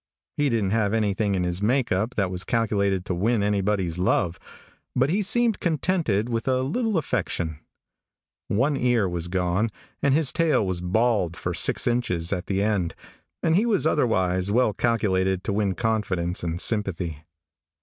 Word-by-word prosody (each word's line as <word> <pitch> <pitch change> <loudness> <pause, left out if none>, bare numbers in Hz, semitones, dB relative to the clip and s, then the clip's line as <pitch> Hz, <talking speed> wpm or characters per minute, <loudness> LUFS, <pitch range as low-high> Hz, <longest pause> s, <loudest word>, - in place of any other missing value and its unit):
He 145 -1 +1
didn't 110 -5 0
have 110 -1 +1
anything 105 -2 0
in 90 - 0
his 90 +1 -2
make 125 +4 +1
up 105 +7 0
that 95 -3 0
was 90 0 -3
calculated 100 -5 0
to - - -2
win 105 +4 +1
anybody's 100 -4 0
love, 90 -1 +1 0.6
but 130 +4 +2
he 200 +4 +1
seemed 230 +2 +2
contented 160 - 0
with 115 0 -3
a 130 -1 +2
little 215 - 0
affection, 80 - -2 0.9
one 135 +8 +1
ear 120 -6 +2
was 85 -1 -4
gone 90 +4 0 0.3
and 140 -1 +3
his 155 -4 +1
tail 160 -10 +2
was 90 -2 -2
bald 95 -2 +1
for - - -3
six - - +1
inches 100 -8 0
at 90 -2 -4
the 100 0 0
end, 100 -6 0 0.5
and 160 - +3
he 215 +6 +3
was 205 -8 +1
otherwise 95 - +1
well 115 -1 +3
calculated 95 -6 +1
to 100 - -2
win 100 -2 0
confidence 95 -6 -1
and 85 +1 -3
sympathy. 90 -8 -2
105 Hz, 165 wpm, -25 LUFS, 90-125 Hz, 0.9 s, and